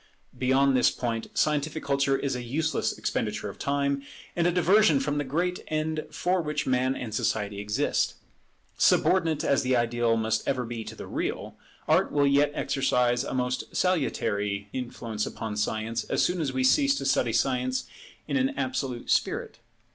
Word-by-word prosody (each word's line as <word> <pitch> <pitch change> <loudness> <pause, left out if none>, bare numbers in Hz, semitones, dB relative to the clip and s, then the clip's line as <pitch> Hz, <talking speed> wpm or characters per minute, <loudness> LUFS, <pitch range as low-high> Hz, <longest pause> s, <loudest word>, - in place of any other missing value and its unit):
Beyond 135 +1 +3
this 125 - +5
point, 115 -2 -3
scientific 150 +1 0
culture 140 -1 +1
is 135 -1 -2
a 125 - -4
useless 155 +7 -1
expenditure - - -2
of - - -11
time, 140 0 0 0.3
and 170 0 +2
a - - +3
diversion 180 -2 +4
from 145 +2 -1
the - - 0
great 175 +6 -1
end 155 0 -2
for 180 0 0
which 150 -1 -2
Man 130 +1 +1
and 115 -4 -6
Society 105 -1 -1
exist. 105 0 0 0.6
Subordinate 165 -5 +3
as 140 - +2
the 130 -1 +1
ideal 120 -1 +1
must 110 0 -1
ever 125 -2 0
be 115 -1 -5
to - - -8
the - - -8
real, - - -4 0.3
Art - - +3
will 145 -1 +3
yet 140 +1 +3
exercise 125 -2 +1
a 135 - -4
most 125 0 -2
salutary 105 - 0
influence 115 -4 -4
upon 110 -2 -5
Science, 110 +2 -1
as - - +1
soon 180 -1 0
as 140 -4 -1
we 130 0 -1
cease 275 - +4
to - - -4
study 135 -3 +2
Science 125 +2 0 0.4
in - - 0
an 265 +2 0
absolute 135 - -2
spirit. - - 0
135 Hz, 170 wpm, -27 LUFS, 120-155 Hz, 0.6 s, this